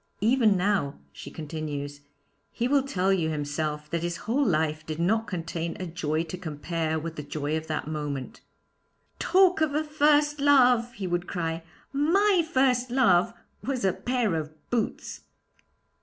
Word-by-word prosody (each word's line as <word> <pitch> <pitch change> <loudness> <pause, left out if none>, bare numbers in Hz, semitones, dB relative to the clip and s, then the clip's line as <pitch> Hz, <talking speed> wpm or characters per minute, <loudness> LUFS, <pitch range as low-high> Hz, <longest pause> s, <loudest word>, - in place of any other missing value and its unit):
Even 220 -2 +4
now,' 185 -7 +1 0.2
she - - -9
continues, 145 -2 -5 0.5
'he 240 - -1
will 280 +1 +4
tell 195 -8 +1
you 165 -4 +1
himself 150 0 -3
that 170 -1 -1
his 170 0 -2
whole 265 +6 +2
life 155 - 0
did 155 -1 -5
not 220 +6 +1
contain 165 -2 -4
a 185 - -3
joy 160 -2 -1
to 170 +2 -7
compare 160 0 -2
with 165 +1 -5
the - - -3
joy 150 +1 -3
of 160 0 -4
that 155 -1 -3
moment. 145 -4 -4 0.8
"Talk 365 -2 +4
of 300 -2 +1
a 305 - +1
first 295 -1 +3
love!" 250 -4 +4
he 200 - -5
would 175 0 -1
cry; 165 -2 -2 0.3
"my 355 +6 +3
first 255 -1 +2
love 235 -9 +4 0.3
was 255 -6 -1
a 190 - +3
pair 245 -6 0
of 155 -1 -3 0.2
boots."' 235 -3 -2
180 Hz, 155 wpm, -27 LUFS, 155-255 Hz, 0.8 s, Even